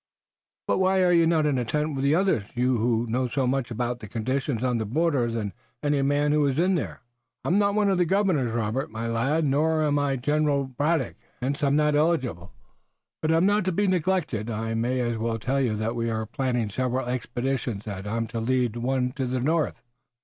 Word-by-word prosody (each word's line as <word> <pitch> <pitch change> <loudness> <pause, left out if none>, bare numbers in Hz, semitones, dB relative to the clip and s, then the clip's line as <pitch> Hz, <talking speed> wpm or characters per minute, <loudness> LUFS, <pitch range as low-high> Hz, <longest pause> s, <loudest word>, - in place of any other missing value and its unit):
"But - - +1
why 190 0 +3
are 180 - +4
you 170 -1 +5
not 160 -2 +2
in 145 -3 +1
the 125 - 0
tent 150 +5 -1
with 135 -1 -3
the 140 +2 +3
others, 185 - +1
you 125 +1 +2
who 115 +1 +1
know 125 +3 0
so 130 +2 -1
much 130 0 0
more 120 - -5
about 120 +1 -2
conditions 120 +3 -2
on 125 -2 +1
the 110 - -2
border 140 -1 +1
than 110 -4 -3 0.3
any 145 -1 +2
man 145 +1 +2
who 150 0 +3
is 135 0 -1
in 180 +3 +3
there?" 170 - -3 0.4
"I - - 0
am 190 +4 +3
not 200 0 +2
one 210 -1 +3
of 190 -2 +2
the 175 - +4
governors, 180 - +1
Robert, 115 +4 -1
my 110 +1 -5
lad, 135 +8 +1
nor 155 +3 +2
am 145 -1 +2
I 140 -1 +1
General 145 +2 +1
Braddock. 145 +2 -1 0.2
Hence 135 +3 -2
I'm 140 0 +3
not 150 0 +3
eligible, 135 - 0 0.7
but 155 - +1
I'm 165 +2 +4
not 205 0 +3
to 185 - +1
be 205 +4 +1
neglected. 175 - 0
I 115 0 -3
may 120 +3 0
as 120 -2 -1
well 115 0 -1
tell 130 +5 -1
you 120 -5 +1
that 110 +2 -2
we 115 0 -1
are 110 -1 -2
planning 120 -2 -1
several 130 +4 -1
expeditions, 125 -3 -3
and 100 -2 -6
that - - -4
I'm 115 0 -1
to 115 - -3
lead 120 -1 0
one 125 +1 0
in 130 -3 -1
the 130 0 -1
north." 155 +5 0
130 Hz, 220 wpm, -26 LUFS, 115-155 Hz, 0.7 s, you